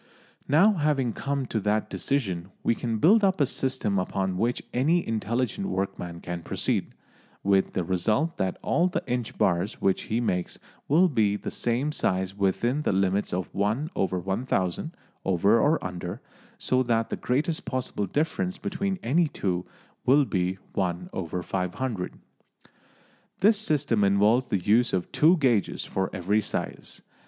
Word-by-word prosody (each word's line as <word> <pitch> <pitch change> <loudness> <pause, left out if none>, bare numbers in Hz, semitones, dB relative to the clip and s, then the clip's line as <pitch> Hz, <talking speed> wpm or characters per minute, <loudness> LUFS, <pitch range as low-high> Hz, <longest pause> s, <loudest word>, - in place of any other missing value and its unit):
Now, 180 +10 +5
having 145 - +1
come 140 +2 -2
to 115 - -2
that 105 +1 0
decision, 95 -11 -2
we - - +3
can 115 -1 -2
build 205 - +5
up 190 -2 +3
a 145 - +5
system 130 -7 -1
upon 95 0 -1
which 120 +6 0
any 160 +8 +2
intelligent 120 - -1
workman 90 - -3
can 90 -1 -5
proceed, - - -2 0.5
with 95 -1 +2
the 90 - 0
result 105 - 0
that 95 -1 -1
all 170 +5 +2
the 185 - -2
inch 125 -1 -3
bars 90 +4 +1
which 95 -1 +1
he 110 - +1
makes 90 -7 -1 0.3
will 170 +6 +5
be 110 - +2
the - - -5
same 125 +5 0
size 95 -8 0
within 105 +8 +1
the - - 0
limits 95 +1 +1
of 90 0 -3
1/1000 100 - -1 0.3
over 100 +5 +3
or 150 +6 +2
under, 90 +3 -5 0.4
so 130 -9 +1
that 115 -2 0
the - - 0
greatest 150 +6 -1
possible 125 -6 -2
difference 160 - -1
between 195 0 -2
any 160 +8 +3
two 90 -9 -2 0.4
will 140 +3 +5
be 95 -4 -1 0.2
1/500. 90 +3 -3 1.3
This 210 +1 +5
system 145 - +1
involves 105 +6 +3
the 100 - +1
use 110 +6 +2
of 90 -2 -1
two 165 +4 +5
gauges 125 - +1
for 95 0 -2
every 100 +4 +1
size. - - -5
115 Hz, 145 wpm, -26 LUFS, 95-140 Hz, 1.3 s, Now